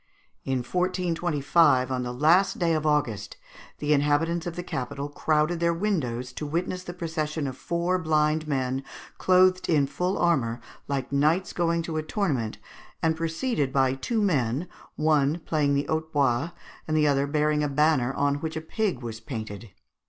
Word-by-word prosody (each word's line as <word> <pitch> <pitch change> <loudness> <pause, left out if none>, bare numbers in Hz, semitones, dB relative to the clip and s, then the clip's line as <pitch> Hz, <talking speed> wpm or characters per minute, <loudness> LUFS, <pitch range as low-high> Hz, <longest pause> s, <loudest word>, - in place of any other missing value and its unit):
In 130 -2 -1
1425, 170 -5 +2
on 130 -1 -1
the 125 0 -3
last 170 +9 +3
day 170 -2 +1
of 155 -1 0
August, 120 -9 0 0.4
the 150 0 +1
inhabitants 150 +4 +1
of 170 - -4
the 175 - -4
capital 140 -1 -4
crowded 155 +3 +1
their 170 0 +2
windows 130 - -2
to 150 - -5
witness 180 +4 -2
the 175 - -7
procession 160 -3 -3
of 130 -2 -4
four 170 +5 -1
blind 155 -1 +1
men, 135 -2 -1 0.4
clothed 185 0 +4
in 150 -4 +4
full 180 +7 -2
armour, 125 -9 +1 0.3
like 140 -1 -2
knights 155 +7 +2
going 170 -1 +1
to 160 -1 -4
a - - +1
tournament, 155 - -1 0.5
and 160 0 +2
preceded 165 - -1
by 130 -1 +2
two 215 - -1
men, 145 - 0 0.3
one 150 -1 +2
playing 150 -3 +1
the 140 - 0
hautbois 155 -3 0 0.4
and 155 0 +1
the 150 - +4
other 140 -1 +2
bearing 150 0 +1
a 145 - 0
banner 140 -3 +2
on 145 0 +1
which 160 +1 -4
a - - -3
pig 170 - -2
was 115 -2 -5
painted. 110 -2 -7
150 Hz, 165 wpm, -26 LUFS, 135-170 Hz, 0.5 s, clothed